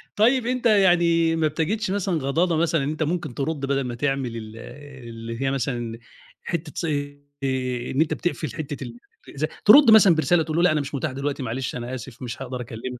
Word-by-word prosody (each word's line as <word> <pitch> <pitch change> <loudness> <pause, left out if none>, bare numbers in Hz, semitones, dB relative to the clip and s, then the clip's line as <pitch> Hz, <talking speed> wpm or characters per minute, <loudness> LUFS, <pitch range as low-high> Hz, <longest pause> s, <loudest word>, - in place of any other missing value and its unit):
طيب 240 +3 +3
أنت 250 0 -2
يعني 175 -6 +4
ما 160 -1 +2
بتجدش 195 +7 -1
مثلًا 195 -2 -1
غضاضة 165 +6 +1
مثلًا 165 -2 +1
إن 140 - -1
أنت 155 +1 -2
ممكن 165 -4 -2
ترد 145 +4 -2
بدل 135 0 0
ما 125 -2 -4
تعمل 135 -2 -1
ال 110 0 -9 0.5
اللي 115 +1 -7
هي 135 0 +1
مثلًا 120 -4 -3 0.4
حتة 165 -2 -4
ص - - -2
آآ، 145 -4 -3
إن 135 - +1
أنت 160 - +1
بتِقفل 160 -7 -3
حتة 145 -2 -5 0.4
الأزع 150 +2 -3 0.2
ترد 260 +3 +8
مثلًا 205 -6 +7
برسالة 165 +1 +2
تقول 155 0 -3
له: 170 - +3
"لأ 180 - +5
أنا 155 -1 +1
مش 145 +1 -6
متاح 140 +2 -2
دلوقتي، 140 +1 -3
معلش 125 +2 -3
أنا 125 +1 -5
آسف 125 0 -10
مش 120 0 -6
هاقدر 125 -1 -5
أكلمك." 120 +1 -7
145 Hz, 200 wpm, -24 LUFS, 130-170 Hz, 0.5 s, ترد